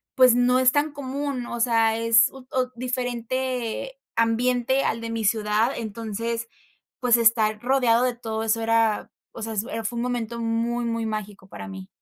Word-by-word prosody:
pues 255 -2 +6
no 250 +1 +3
es 255 0 +5
tan 295 +1 +1
común, 275 -2 -4
o 240 - -5
sea, 225 -2 +3
es 230 0 +5
ut 265 -1 -13
ot 255 -1 -1
diferente 250 - -3 0.2
ambiente 245 +3 +2
al 230 - 0
de 230 - -5
mi 225 -1 -2
ciudad, 215 +2 +2
entonces, 230 +1 -4 0.5
pues, 245 -3 +4
estar 220 -2 +3
rodeado 245 -2 +3
de 250 -1 0
todo 225 -2 -4
eso 225 +1 +1
era, 225 -1 +1 0.2
o 230 - -9
sea, 225 - -4
es, 210 -1 -1
eh, 225 -2 -5
fue 235 +3 -3
un 235 - -1
momento 235 -2 -3
muy, 230 +1 -1
muy 230 -1 -2
mágico, 210 -3 -5
para 100 - -9
mí. 95 -1 -9
230 Hz, 180 wpm, -24 LUFS, 225-250 Hz, 0.5 s, pues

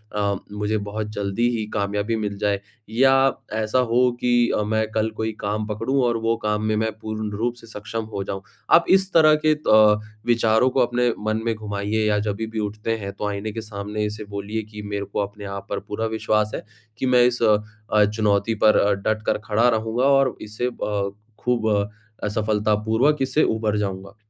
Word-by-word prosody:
अ, 100 -1 +1 0.2
मुझे 105 +1 -1
बहुत 105 +1 -4
जल्दी 105 +3 0
ही 110 - -2
कामयाबी 105 +2 -1
मिल 105 -2 -3
जाए 100 -1 0 0.3
या 135 +3 +4 0.2
ऐसा 110 +3 +1
हो 125 +1 +3
कि 120 -1 +3
अ, - - +1
मैं 110 +1 0
कल 110 0 0
कोई 110 0 -1
काम 105 +1 -2
पकड़ूँ 115 +6 0
और 120 -1 +2
वो 115 0 +1
काम 105 0 +1
में 110 0 +1
मैं 110 +1 0
पूर्ण 110 -1 -4
रूप 120 +2 0
से 115 -1 -15
सक्षम 110 +1 -5
हो 100 -1 -2
जाऊँ, 95 0 -5 0.3
आप 170 - +7
इस 190 0 +4
तरह 155 -2 +6
के 155 - +6
अ, 110 -8 +5 0.3
विचारों 115 +1 +3
को 130 - 0
अपने 120 -1 +2 0.2
मन 110 +1 0
में 115 - +1
घुमाइए 105 -1 -3
या 105 -1 +2
जब 105 -1 -2
भी 110 - -2
भी 110 0 -5
उठते 105 +1 -3
हैं 100 -2 -5
तो 105 - -4
आईने 105 +1 -3
के 110 +1 -5
सामने 105 0 -4
इसे 105 0 -5
बोलिए 100 +2 -3
कि 105 0 -10
मेरे 100 -1 -3
को 100 - -4
अपने 100 0 -4
आप 100 0 -6
पर 100 - -2
पूरा 105 +2 -4
विश्वास 110 -1 0
है, - - -4 0.4
कि - - -2
मैं 125 -1 +5
इस 120 -1 +1
अ 105 -2 +5 0.4
अ, 105 -1 +6
चुनौती 105 +1 +1
पर 110 -1 +6
अ, 100 - +3
डट 110 +2 -1
कर - - +1
खड़ा 115 +3 +3
रहूँगा 115 +2 0
और 135 -1 +4
इसे 110 +3 -4
अ, 105 -5 -2 0.3
खूब 120 -3 0 0.6
असफलतापूर्वक 110 +5 +1
इससे 135 +3 +2
उभर 110 -1 0
जाऊँगा। 100 -1 -4
110 Hz, 200 wpm, -23 LUFS, 105-115 Hz, 0.6 s, आप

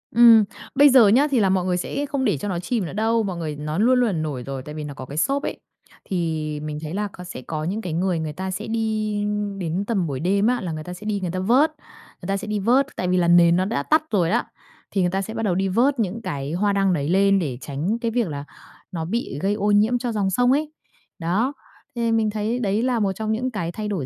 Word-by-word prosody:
Ừm, 230 -2 +8 0.3
bây 290 +1 +7
giờ 250 -5 +7
nhá 255 +9 +5
thì 260 - +3
là 195 -3 +3
mọi 185 -1 +1
người 180 -1 +1
sẽ 280 +10 -3
không 275 -2 -2
để 200 - +2
cho 170 - -5
nó 180 -3 -2
chìm 200 +2 -2
nữa - - -6
đâu. 225 +2 +1
Mọi 185 -4 -3
người 155 -3 -4
nó 150 +2 -4
luôn 250 +5 +4
luôn, 245 - +3
à, - - -1
nổi 155 -7 -3
rồi 135 0 -5
tại 150 +2 -8
vì 155 - -5
nó 145 -1 -6
có 130 - -8
cái 140 +3 -8
xốp 275 - +1
ấy, - - -4 0.5
thì 160 -4 -2
mình 150 0 -4
thấy 155 0 -6
là 210 +2 -1
có 180 - -9
sẽ 175 -7 -8
có 155 +3 -4
những 195 +7 -2
cái 180 -6 -4
người 175 0 0
người 155 -1 -4
ta 190 +4 -4
sẽ 205 +4 -5
đi 220 -2 -1 0.4
đến 180 +2 -2
tầm 195 -7 0
buổi 135 -3 -3
đêm 200 +6 +2
á 245 0 +1
là 180 - -4
người 155 -1 -5
ta 180 - -7
sẽ 180 +4 -11
đi 210 -1 -1
người 180 -2 -2
ta 185 - -3
vớt. 250 +11 +3 0.5
Người 175 - -7
ta 195 0 0
sẽ 210 - -6
đi 210 -1 -1
vớt, 250 +7 +3
tại 180 - -2
vì 180 0 +2
là 175 -1 +2
nền 170 0 +6
nó 185 +1 +1
đã 140 -8 -1
tắt 310 - +3
rồi 180 -5 +2
đó, - - +2 0.5
thì 195 - +1
người 180 - +2
ta 195 - 0
sẽ 220 +3 -6
bắt 225 - -3
đầu 190 -5 +1
đi 195 +1 +1
vớt 245 +7 +2
những 215 +2 -1
cái 140 -7 -4
hoa 200 +4 +1
đăng 195 -1 +2
đấy 145 -3 -1
lên 195 +2 +4
để 140 -9 -3
tránh 155 - -2
cái 230 -1 -1
việc 235 -3 0
là 140 -3 -5 0.5
nó 165 -3 -3
bị 185 - -3
gây 195 +2 +1
ô 210 0 0
nhiễm 215 +4 +4
cho 245 -1 -3
dòng 205 -3 0
sông 245 +6 +2
ấy. 300 +3 +1 0.5
Đó, 195 +11 0 0.4
thì 235 -1 0
mình 225 -1 +2
thấy 215 +3 -2
đấy 210 -2 0
là 250 -2 +1
một 200 -2 +1
trong 215 +3 -3
những 250 +4 -1
cái 170 -7 -3
thay 210 +4 -5
đổi 185 -10 -2
195 Hz, 280 wpm, -23 LUFS, 170-225 Hz, 0.5 s, Ừm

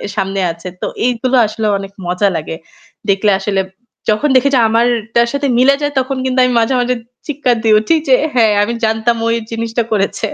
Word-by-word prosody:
সামনে 195 -1 -2
আছে। 170 +2 -10
তো - - -2 0.2
এইগুলো 250 +1 0
আসলে 220 +1 -4
অনেক 195 0 -8 0.2
মজা 180 +3 +1
লাগে। 160 0 -4 0.5
দেখলে 200 +1 +2
আসলে 195 -2 -1 0.5
যখন 215 +8 +1
দেখি 280 +2 +4
যে 250 - +4
আমারটার 235 0 +1
সাথে 280 0 -1
মিলে 275 +2 +5
যায় 290 0 -1
তখন 260 +1 -2
কিন্তু 260 0 0
আমি 250 -1 +2
মাঝে, 225 +3 +1
মাঝে, 250 +1 0 0.3
চিৎকার 275 -4 0
দিয়ে 220 -1 +4
উঠি 220 +10 +1
যে 265 - +4 0.2
হ্যাঁ 230 -4 +4
আমি 235 - -2
জানতাম 225 +2 0
ও - - +1
এই - - -5
জিনিসটা 230 +1 -2
করেছে। 210 +1 -1
230 Hz, 190 wpm, -15 LUFS, 215-255 Hz, 0.5 s, মিলে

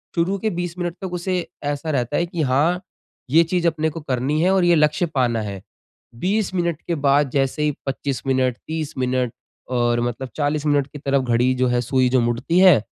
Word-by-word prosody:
शुरू 185 +3 +1
के 220 +3 0
20 175 0 -3
मिनट 175 -1 -3
तक 185 -2 -5
उसे 180 +1 -1 0.3
ऐसा 145 +2 -2
रहता 130 0 0
है 170 - +1
कि 170 -1 -4
हाँ, 150 +7 +2 0.5
ये 165 +4 +6
चीज 175 0 0
अपने 160 -1 0
को 160 +2 -7
करनी 140 +2 -1
है 185 - +3
और 190 -2 +3
ये 175 0 +5
लक्ष्य 150 +2 +2
पाना 120 -4 +1
है। 100 -2 -5 0.5
20 190 - -1
मिनट 170 -3 -1
के 170 - 0
बाद 140 -1 +2
जैसे 135 +2 0
ही 150 - +2 0.2
25 135 -2 -3
मिनट, 130 -2 +1
30 160 -2 -3
मिनट 125 -2 0 0.4
और 120 -1 +1
मतलब 120 +2 -3
40 150 0 -1
मिनट 145 -2 +2
की 145 - -10
तरफ 135 -1 +1
घड़ी 125 +1 +2
जो 130 0 +1
है, 120 0 +1
सुई 130 +1 +2
जो 130 0 +3
मुड़ती 120 +9 +1
है, 180 - +7
145 Hz, 210 wpm, -21 LUFS, 130-170 Hz, 0.5 s, है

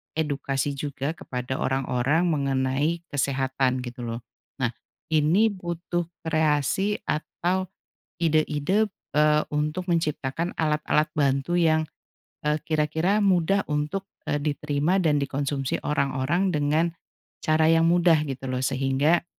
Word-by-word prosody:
edukasi 140 -3 -1
juga 140 0 -3
kepada 130 -4 -5
orang-orang 135 +4 +1
mengenai 140 +3 0
kesehatan, 130 -2 0
gitu 125 0 -8
loh. 115 0 -4 0.4
Nah 120 - +2 0.4
ini 165 +9 +4
butuh 175 -2 -3 0.2
kreasi 160 +5 +1
atau 180 +4 -1 0.5
ide-ide, 160 +5 +1 0.2
eee, 150 0 +4
untuk 150 +4 -1
menciptakan 165 -1 -1
alat-alat 150 -1 +2
bantu 140 +2 +1
yang, 160 -2 +3 0.6
eee, 150 0 +1
kira-kira 160 +5 +1
mudah 195 +1 +2
untuk, 150 +6 -2 0.2
eee, 145 - +1
diterima 150 +4 0
dan 150 -4 +3
dikonsumsi 140 -1 -2
orang-orang 145 +6 0
dengan 150 +2 +2 0.6
cara 155 0 +3
yang 165 0 +4
mudah, 170 -2 +4
gitu 135 0 -5
loh. 130 -1 -2
Sehingga 135 +6 +2
150 Hz, 110 wpm, -25 LUFS, 135-170 Hz, 0.6 s, ini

